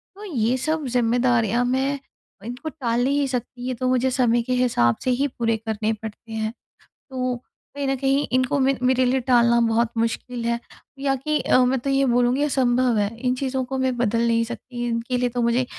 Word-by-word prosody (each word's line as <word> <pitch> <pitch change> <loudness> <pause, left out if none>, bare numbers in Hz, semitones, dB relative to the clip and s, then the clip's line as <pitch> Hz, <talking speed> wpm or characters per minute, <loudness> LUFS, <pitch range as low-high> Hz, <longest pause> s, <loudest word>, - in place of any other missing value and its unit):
तो 410 - -11
ये 250 - 0
सब 310 +4 -1
ज़िम्मेदारियाँ 240 -1 +2
मैं 265 +3 0 0.5
इनको 245 +7 -5
टाल 245 -5 -1
नहीं 280 +2 +1
सकती 250 -1 -4
ये 255 - -1
तो 255 +1 -2
मुझे 255 0 +2
समय 240 -2 +2
के 255 - -2
हिसाब 230 - +2
से 255 - +1
ही 270 +3 +1
पूरे 230 -4 -1
करने 220 -1 -2
पड़ते 220 +1 -9
हैं। 220 0 -2 0.6
तो 255 -1 -2 0.4
कहीं 285 -1 -2
न 270 - +1
कहीं 275 +2 +1
इनको 255 +2 +1
मे 270 +1 +3
मेरे 255 0 +3
लिए 260 +2 +2
टालना 235 -1 +5
बहुत 225 0 +1
मुश्किल 230 +1 -2
है 235 0 0 0.4
या 275 0 +1
कि 300 +3 -1
अ, - - +3
मैं 260 +1 +1
तो 275 - -3
ये 275 0 +3
बोलूँगी 245 +2 +2
असंभव 255 -4 +2
है 205 -1 +1
इन 250 +1 0
चीज़ों 260 0 -2
को 265 +1 -4
मैं 260 -1 0
बदल 235 0 +1
नहीं 230 0 +2
सकती 240 +1 -6
इनके 235 +2 -1
लिए 245 0 +1
तो 245 0 -2
मुझे 235 +2 +2
250 Hz, 200 wpm, -23 LUFS, 235-265 Hz, 0.6 s, टालना